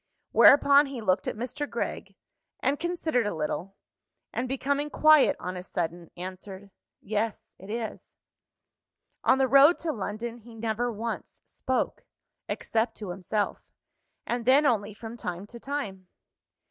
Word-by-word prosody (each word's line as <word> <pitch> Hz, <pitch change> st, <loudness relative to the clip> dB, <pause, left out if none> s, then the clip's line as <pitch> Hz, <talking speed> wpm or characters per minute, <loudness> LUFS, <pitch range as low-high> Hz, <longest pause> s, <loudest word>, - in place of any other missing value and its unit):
Whereupon 285 Hz, 0 st, +7 dB
he 270 Hz, -3 st, -6 dB
looked 195 Hz, -3 st, +1 dB
at -, -, -2 dB
Mr. 255 Hz, +6 st, -4 dB
Gregg -, -, -4 dB, 0.4 s
and 280 Hz, +2 st, 0 dB
considered 325 Hz, -9 st, 0 dB
a 205 Hz, -, -2 dB
little 160 Hz, +5 st, -3 dB, 0.6 s
and, 250 Hz, -, -2 dB
becoming 280 Hz, +3 st, -1 dB
quiet 305 Hz, -2 st, +5 dB
on 180 Hz, +1 st, -5 dB
a 180 Hz, -, -5 dB
sudden, 170 Hz, -2 st, -4 dB
answered, 190 Hz, +2 st, -8 dB, 0.3 s
"Yes, 215 Hz, +1 st, -3 dB
it 195 Hz, -, -12 dB
is." 225 Hz, 0 st, -6 dB, 1.1 s
On 260 Hz, -, +5 dB
the 265 Hz, -1 st, +3 dB
road 280 Hz, +6 st, +7 dB
to 330 Hz, -, -2 dB
London, 225 Hz, +2 st, -5 dB
he 230 Hz, 0 st, -14 dB
never 230 Hz, +2 st, -1 dB
once 230 Hz, +1 st, -6 dB
spoke 260 Hz, -1 st, -2 dB, 0.5 s
except 225 Hz, +1 st, -1 dB
to 205 Hz, -4 st, -5 dB
himself 195 Hz, +3 st, -2 dB, 0.6 s
and 240 Hz, 0 st, -2 dB
then 270 Hz, +4 st, +6 dB
only 210 Hz, -5 st, +1 dB
from 225 Hz, +2 st, -8 dB
time 180 Hz, -2 st, -5 dB
to 235 Hz, +3 st, -11 dB
time. 220 Hz, -10 st, -5 dB
230 Hz, 140 wpm, -27 LUFS, 195-270 Hz, 1.1 s, Whereupon